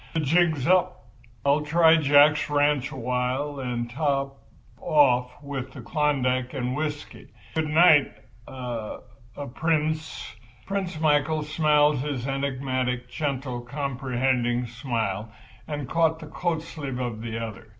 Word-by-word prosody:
The 160 - +2
jig's 160 -2 +2
up. 180 -9 +1 0.3
I'll 140 +2 +3
try 160 +2 +5
Jack's 145 -1 +5
ranch 145 -1 +2
awhile 130 +2 -2
and 120 -2 -3
top 135 +1 -1 0.4
off 125 -5 +3
with 140 -3 -5
the 130 - -9
Klondike 130 -1 0
and 125 -1 -2
whiskey. 150 -1 -5 0.3
Good 160 -1 0
night—er—er—Prince." 140 - -1 0.3
Prince 190 -4 -3
Michael 155 0 +2
smiled 150 -1 +3
his 135 -2 -3
enigmatic, 130 -2 -2
gentle, 135 -4 -3
comprehending 125 -2 -1
smile 115 -4 -3 0.4
and 145 -3 -4
caught 160 +1 +2
the 160 - -10
coat 160 +1 -2
sleeve 140 -6 -6
of 120 -3 -4
the 115 -1 -4
other. 110 -1 -6
140 Hz, 115 wpm, -25 LUFS, 125-150 Hz, 0.4 s, try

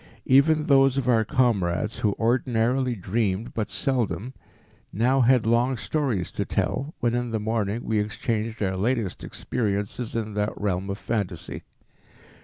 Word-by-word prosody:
Even 150 +3 +4
those 135 -1 +4
of 130 -3 -1
our 115 -3 +4
comrades 110 - 0
who 105 -2 +1
ordinarily 120 +1 +1
dreamed 100 +2 -1
but 105 -2 -2
seldom, 125 +3 -1 0.6
now 125 +6 +2
had 125 -1 +4
long 120 +3 +2
stories 120 - -1
to - - -2
tell, 145 +4 -2
when 120 -1 +1
in 120 0 -1
the 110 -1 -1
morning 110 +1 -1
we 110 -1 0
exchanged 110 +1 -2
our 95 -1 0
latest 110 0 -1
experiences 105 +1 -3
in 110 -2 -2
that 105 0 -2
realm 95 -1 -1
of 100 - -3
phantasy. 105 -5 -4
115 Hz, 145 wpm, -25 LUFS, 105-125 Hz, 0.6 s, Even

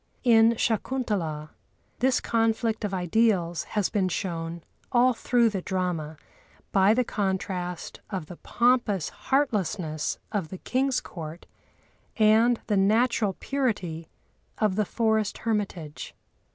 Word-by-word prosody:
In 230 -1 +6
Shakuntalâ 205 -10 -1 0.5
this 260 +1 +3
conflict 225 0 0
of 205 - -1
ideals 180 -2 +1
has 205 - +2
been 195 -3 +1
shown, 170 -2 -4 0.3
all 250 +1 +4
through 235 0 +2
the 195 -3 -3
drama, 175 -5 -2 0.5
by 195 +3 +4
the 250 - +3
contrast 190 -4 -3
of 190 -6 -4
the 170 +2 -10
pompous 240 - +1
heartlessness 200 - -1
of 200 -7 -1
the 185 - -8
king's 260 +5 0
court 165 -1 -8 0.7
and 225 +2 +4
the 210 - +1
natural 215 +1 +2
purity 185 - -2 0.5
of 210 -3 +1
the 210 0 +1
forest 220 0 0
hermitage. 200 -9 -3
205 Hz, 115 wpm, -26 LUFS, 180-230 Hz, 0.7 s, In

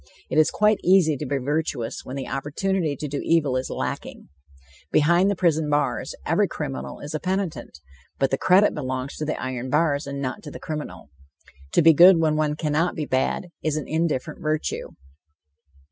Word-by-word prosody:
It - - +3
is 155 - +5
quite 210 0 +2
easy 180 -5 +4
to 150 - -5
be 140 - 0
virtuous 140 -3 -2
when 130 - -7
the 135 -2 -5
opportunity 150 +4 -1
to 150 - -5
do 145 0 -3
evil 150 -6 +2
is 130 0 -2
lacking. - - -5 0.6
Behind 170 +6 +4
the 200 - 0
prison 160 -4 +1
bars, 145 -4 -1
every - - +2
criminal 65 0 -6
is 145 +2 -7
a 155 - -2
penitent, 185 - -3 0.4
but 135 -1 +1
the 135 - +1
credit 190 +3 +4
belongs 130 -1 -4
to 155 - -3
the 155 - -3
iron 130 0 -4
bars 150 0 +1
and 140 0 -5
not 130 -2 -4
to 150 - -9
the - - -9
criminal. 150 - -7 0.6
To - - +4
be 165 0 +8
good 175 +4 +8
when 160 -2 +2
one 155 -1 0
cannot 155 +3 0
be 155 - -3
bad, 130 +7 -1
is 155 -1 -1
an 155 - -4
indifferent 160 -2 -2
virtue. 155 -1 -2
150 Hz, 185 wpm, -24 LUFS, 135-165 Hz, 0.6 s, be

